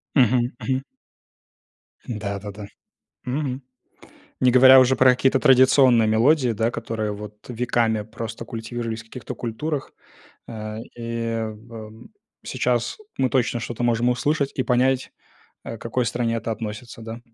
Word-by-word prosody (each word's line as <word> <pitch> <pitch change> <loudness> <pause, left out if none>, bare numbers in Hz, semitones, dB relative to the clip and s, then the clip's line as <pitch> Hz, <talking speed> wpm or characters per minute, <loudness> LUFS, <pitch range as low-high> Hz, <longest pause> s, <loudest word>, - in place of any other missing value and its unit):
Мгм, 125 -2 +3
мгм. 130 0 -1 1.2
Да-да-да. 100 -2 -5 0.6
Мгм. 135 0 -3 0.8
Не 125 - +5
говоря 130 +1 +8
уже 130 +1 +4
про 130 0 +6
какие-то 130 +1 +2
традиционные 130 -4 +5
мелодии, 125 +5 +3
да, 115 +2 0
которые 110 -3 -3
вот 105 0 -8
веками 115 -2 0
просто 115 +1 -7
культивировались 115 0 -5
в - - -19
каких-то 115 +1 -8
культурах. 135 +5 -4 0.6
Э, 110 -1 -6 0.2
и 115 -1 -3
в 110 0 -11 0.4
сейчас 120 -1 -1 0.2
мы 130 -1 +2
точно 120 -1 +1
что-то 120 +1 -5
можем 120 0 +2
услышать 140 +3 0
и 130 - 0
понять, 130 +1 +1 0.5
э, 115 - -6
к - - -28
какой 120 +1 -1
стране 115 0 -1
это 115 - -4
относится, 110 +1 -6
да. 115 +1 -7
120 Hz, 130 wpm, -23 LUFS, 110-130 Hz, 1.2 s, говоря